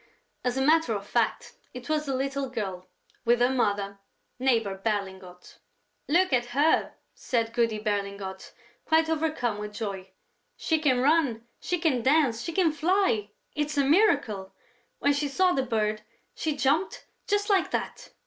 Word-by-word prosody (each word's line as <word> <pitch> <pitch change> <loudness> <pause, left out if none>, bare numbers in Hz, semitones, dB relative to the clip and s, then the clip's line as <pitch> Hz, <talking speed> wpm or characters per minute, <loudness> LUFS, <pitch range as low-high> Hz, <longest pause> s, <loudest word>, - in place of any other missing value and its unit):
As 250 +1 -1
a 265 - +1
matter 315 -6 +3
of 200 0 -5
fact, - - -1 0.2
it 250 -1 -8
was 305 -1 -1
the 270 - -1
little 275 0 -2
girl, 195 -7 -5 0.4
with 240 0 +3
her 245 +1 +3
mother, 200 -5 -1 0.4
Neighbor 230 -6 +1
Berlingot. 190 -3 -5 0.5
"Look 355 +1 +3
at 240 -1 +2
her," 310 +3 +2 0.2
said 230 -2 -2
Goody 230 -2 +1
Berlingot, 200 -2 -4 0.3
quite 320 0 +2
overcome 305 -9 -1
with 210 0 -7
joy. 195 -4 -5 0.5
"She 320 -1 0
can 260 -5 +2
run, 270 -6 +2
she 360 - -1
can 315 -8 +1
dance, 265 -3 +2
she 335 - -4
can 335 -1 +2
fly! 325 - +1 0.2
It's 300 0 -2
a 280 - +4
miracle! 280 - +2 0.4
When 285 - +2
she 285 +1 -1
saw 365 +6 +2
the 270 - +1
bird, 215 -4 -1 0.3
she 310 -2 -2
jumped, 280 +8 0 0.2
just 410 +1 +1
like 390 -2 +3
that...." - - -4
255 Hz, 155 wpm, -27 LUFS, 210-310 Hz, 0.5 s, a